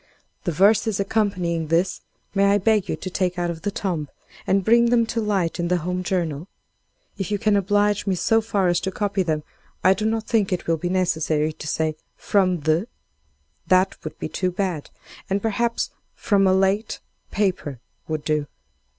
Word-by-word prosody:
The 175 Hz, -, +1 dB
verses 200 Hz, +4 st, +3 dB
accompanying 185 Hz, -6 st, 0 dB
this, 170 Hz, +4 st, +1 dB, 0.3 s
may 200 Hz, -1 st, +3 dB
I 200 Hz, +1 st, +4 dB
beg 210 Hz, 0 st, +2 dB
you -, -, 0 dB
to 185 Hz, -, -6 dB
take 180 Hz, 0 st, -1 dB
out 175 Hz, -1 st, 0 dB
of 165 Hz, -1 st, -8 dB
the 205 Hz, -, -1 dB
tomb, 175 Hz, -7 st, -3 dB, 0.4 s
and 195 Hz, -1 st, +2 dB
bring 235 Hz, +1 st, +5 dB
them 235 Hz, -1 st, +4 dB
to 230 Hz, 0 st, -2 dB
light 195 Hz, -5 st, 0 dB
in 175 Hz, -, 0 dB
the 180 Hz, +1 st, +2 dB
'Home 180 Hz, +2 st, -2 dB
Journal?' 170 Hz, -3 st, -2 dB, 0.7 s
If 195 Hz, -, -2 dB
you 205 Hz, -, 0 dB
can 215 Hz, 0 st, +2 dB
oblige 205 Hz, +1 st, +2 dB
me 190 Hz, -, +2 dB
so 225 Hz, +5 st, +2 dB
far 205 Hz, -4 st, 0 dB
as 175 Hz, -1 st, +2 dB
to 190 Hz, -, -3 dB
copy 200 Hz, 0 st, -1 dB
them, 155 Hz, -4 st, -1 dB, 0.4 s
I 190 Hz, -, +6 dB
do 210 Hz, +3 st, -3 dB
not 225 Hz, 0 st, 0 dB
think 215 Hz, -5 st, +1 dB
it 180 Hz, -, -1 dB
will 165 Hz, 0 st, +1 dB
be 175 Hz, +3 st, -3 dB
necessary 160 Hz, -4 st, +1 dB
to 150 Hz, -, -8 dB
say 155 Hz, 0 st, 0 dB, 0.2 s
'From 185 Hz, -4 st, +1 dB
the 160 Hz, +7 st, +1 dB, 0.4 s
——,' 70 Hz, +1 st, -43 dB
that 185 Hz, +1 st, +2 dB
would 155 Hz, -, -7 dB
be -, -, -4 dB
too 180 Hz, +4 st, -1 dB
bad; 180 Hz, -4 st, -3 dB, 0.4 s
and, 195 Hz, +1 st, +1 dB
perhaps, 230 Hz, +2 st, -1 dB, 0.2 s
'From 195 Hz, -2 st, +2 dB
a 185 Hz, -, +4 dB
late 195 Hz, +3 st, +1 dB, 0.2 s
—— -, -, -45 dB
paper,' 175 Hz, -, 0 dB, 0.3 s
would 155 Hz, -1 st, -3 dB
do. 150 Hz, -2 st, 0 dB
185 Hz, 195 wpm, -23 LUFS, 165-205 Hz, 0.7 s, I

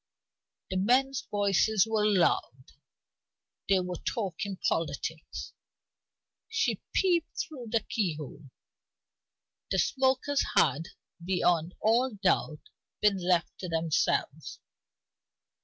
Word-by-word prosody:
The 185 Hz, -, 0 dB
men's 255 Hz, +7 st, +2 dB
voices 205 Hz, 0 st, +2 dB
were 220 Hz, -1 st, +1 dB
loud: 170 Hz, -10 st, +1 dB, 1.0 s
they 190 Hz, -1 st, +4 dB
were 180 Hz, -1 st, -5 dB
talking 200 Hz, -3 st, -3 dB
politics. 160 Hz, 0 st, -3 dB, 1.0 s
She 455 Hz, 0 st, 0 dB
peeped 345 Hz, -4 st, +1 dB
through 260 Hz, -7 st, -5 dB
the 230 Hz, 0 st, +1 dB
keyhole; 155 Hz, -, -4 dB, 1.2 s
the -, -, 0 dB
smokers 265 Hz, +1 st, +1 dB
had, 165 Hz, +4 st, +3 dB, 0.4 s
beyond 175 Hz, -2 st, +1 dB
all 235 Hz, +2 st, +2 dB
doubt, 180 Hz, -6 st, 0 dB, 0.3 s
been 210 Hz, -2 st, +3 dB
left 175 Hz, -2 st, 0 dB
to 180 Hz, -, -5 dB
themselves. 165 Hz, -1 st, -1 dB
195 Hz, 90 wpm, -29 LUFS, 170-235 Hz, 1.2 s, they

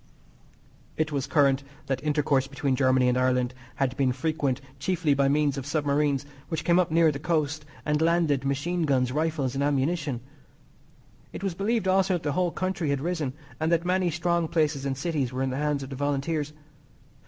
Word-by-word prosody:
It 155 Hz, 0 st, 0 dB
was 140 Hz, -2 st, -2 dB
current 140 Hz, -3 st, +3 dB, 0.2 s
that 135 Hz, -1 st, -2 dB
intercourse 145 Hz, -3 st, +1 dB
between 140 Hz, -1 st, -1 dB
Germany 130 Hz, -1 st, +3 dB
and 125 Hz, -, +3 dB
Ireland 125 Hz, -1 st, +1 dB, 0.2 s
had 135 Hz, -2 st, 0 dB
been 135 Hz, -2 st, +2 dB
frequent 140 Hz, -1 st, -1 dB, 0.2 s
chiefly 165 Hz, 0 st, +1 dB
by 140 Hz, 0 st, +2 dB
means 145 Hz, -1 st, +2 dB
of 130 Hz, -, -7 dB
submarines, 145 Hz, -2 st, +1 dB, 0.2 s
which 160 Hz, -3 st, -2 dB
came 175 Hz, 0 st, +4 dB
up 180 Hz, -, +2 dB
near 165 Hz, 0 st, +4 dB
the 140 Hz, -, -5 dB
coast 155 Hz, -1 st, -1 dB, 0.2 s
and 150 Hz, 0 st, +1 dB
landed 165 Hz, -5 st, +2 dB
machine 160 Hz, +5 st, 0 dB
guns, 130 Hz, -3 st, +2 dB
rifles 150 Hz, -3 st, -1 dB
and 135 Hz, -, -1 dB
ammunition. 140 Hz, -2 st, 0 dB, 1.1 s
It -, -, -7 dB
was 195 Hz, -3 st, -1 dB
believed 205 Hz, +3 st, 0 dB
also 190 Hz, 0 st, +3 dB
that 175 Hz, -, -4 dB
the 145 Hz, -, 0 dB
whole 180 Hz, +4 st, +1 dB
country 185 Hz, -3 st, -2 dB
had 140 Hz, -1 st, +1 dB
risen, 160 Hz, -5 st, -2 dB, 0.3 s
and 160 Hz, +1 st, 0 dB
that 170 Hz, 0 st, +2 dB
many 180 Hz, 0 st, +2 dB
strong 170 Hz, 0 st, 0 dB
places 150 Hz, -4 st, 0 dB
and 135 Hz, -1 st, -2 dB
cities 140 Hz, -4 st, -1 dB
were 130 Hz, +1 st, -2 dB
in 135 Hz, -, -1 dB
the 130 Hz, -, -3 dB
hands 145 Hz, -1 st, 0 dB
of 135 Hz, -, -9 dB
the -, -, -4 dB
Volunteers. 145 Hz, +2 st, -1 dB
145 Hz, 190 wpm, -27 LUFS, 135-165 Hz, 1.1 s, came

